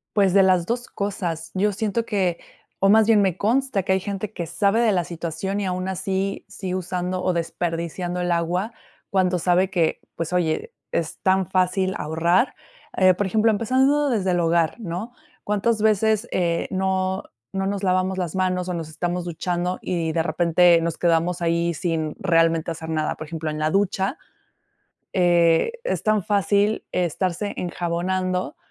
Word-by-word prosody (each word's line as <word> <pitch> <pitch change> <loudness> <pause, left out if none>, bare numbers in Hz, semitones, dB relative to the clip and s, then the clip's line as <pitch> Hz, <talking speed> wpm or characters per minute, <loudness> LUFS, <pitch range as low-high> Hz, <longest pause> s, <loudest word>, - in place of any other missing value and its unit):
Pues, 195 -3 +3
de 195 -1 +6
las 185 -2 +3
dos 240 +3 -2
cosas. 175 -5 -4
Yo 205 +2 +1
siento 220 +2 -1
que, 190 -6 0 0.4
o 195 - +4
más 220 +1 +6
bien 220 -2 +5
me 185 -2 +1
consta 235 -1 +1
que 190 - -1
hay 190 - +2
gente 200 +2 -4
que 170 - -4
sabe 200 +6 +1
de 230 - +3
la 180 -3 +1
situación 175 +4 -4
y 200 - -2
aún 185 0 -2
así 190 +1 -2
sigue 185 -2 -5
usando 180 0 -2
o 185 - +1
desperdiciando 170 +1 -3
el 175 0 0
agua 175 +6 0 0.4
cuando 185 -2 +2
sabe 180 +2 +2
que 175 -5 +1 0.2
pues 165 +1 -4
oye, 165 -3 0 0.2
es 160 -2 -2
tan 190 -1 +2
fácil 185 +1 +1
ahorrar, 170 - +1 0.4
eh, 185 -1 +6
por 205 - -1
ejemplo, 220 +3 +3
empezando 265 +7 +2
desde 195 -6 +1
el 175 - +1
hogar, 165 -1 +2
¿no?, 205 +4 -5 0.3
cuántas 210 +2 0
veces, 220 +1 +2
eh, 170 -2 0
no 190 0 0 0.3
no 195 0 -2
nos 200 0 -2
lavamos 185 0 +1
las 175 -2 -3
manos 185 -1 0
o 180 - -2
nos 160 -2 -5
estamos 175 +3 -3
duchando 175 +1 -2
y 165 -3 -1
de 165 0 +1
repente 170 0 +4
nos 165 -1 -2
quedamos 175 +1 +1
ahí 170 0 +1
sin 160 -2 -2
realmente 165 -2 +2
hacer 160 0 -6
nada. 155 -1 -1
Por 155 - -8
ejemplo, 160 0 -4
en 150 - -4
la 155 0 0
ducha, 195 -1 0 1.0
eh, 175 - +3
es - - -1
tan 215 -2 +2
fácil 205 +1 +1
estarse 180 +3 -1
enjabonando 180 +1 -2
185 Hz, 170 wpm, -23 LUFS, 170-200 Hz, 1.0 s, de